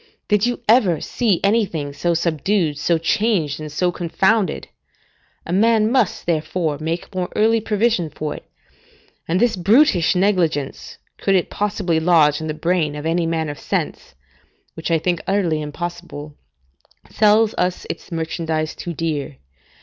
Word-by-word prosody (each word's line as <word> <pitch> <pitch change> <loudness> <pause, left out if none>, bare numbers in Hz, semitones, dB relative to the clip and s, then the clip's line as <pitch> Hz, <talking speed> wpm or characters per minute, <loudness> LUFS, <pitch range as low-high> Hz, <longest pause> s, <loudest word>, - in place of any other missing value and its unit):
Did 210 +2 +2
you 245 - -2
ever 210 - +4
see 220 -8 0
anything 195 -9 0
so 170 +4 0
subdued, 165 -1 0
so 170 +2 +2
changed, 165 -3 0
and 155 -1 -7
so 180 +4 0
confounded? 190 +4 0 0.8
A 170 - -4
man 220 +2 +3
must, 250 -7 +1
therefore, 160 -2 -1
make 165 +5 -4
more 185 -1 -2
early 225 +1 +3
provision 210 -5 +1
for 150 0 -4
it; - - -10 0.8
and 175 +3 +1
this 235 0 +2
brutish 195 - +3
negligence, 175 -7 0 0.2
could 195 - +2
it 180 - 0
possibly 200 -5 0
lodge 160 -3 +3
in 160 - -4
the 155 - -3
brain 165 -2 0
of 150 +1 -6
any 165 +1 +1
man 165 -1 -1
of 145 -1 -6
sense - - -3 0.6
(which 160 - -5
I 165 - +3
think 175 +2 -1
utterly 180 -6 +1
impossible), 150 -1 -6 0.8
sells 215 +1 +4
us 180 0 -1
its - - -7
merchandise 160 -1 -2
too 170 -1 -6
dear. 150 - -3
175 Hz, 150 wpm, -20 LUFS, 155-205 Hz, 0.8 s, ever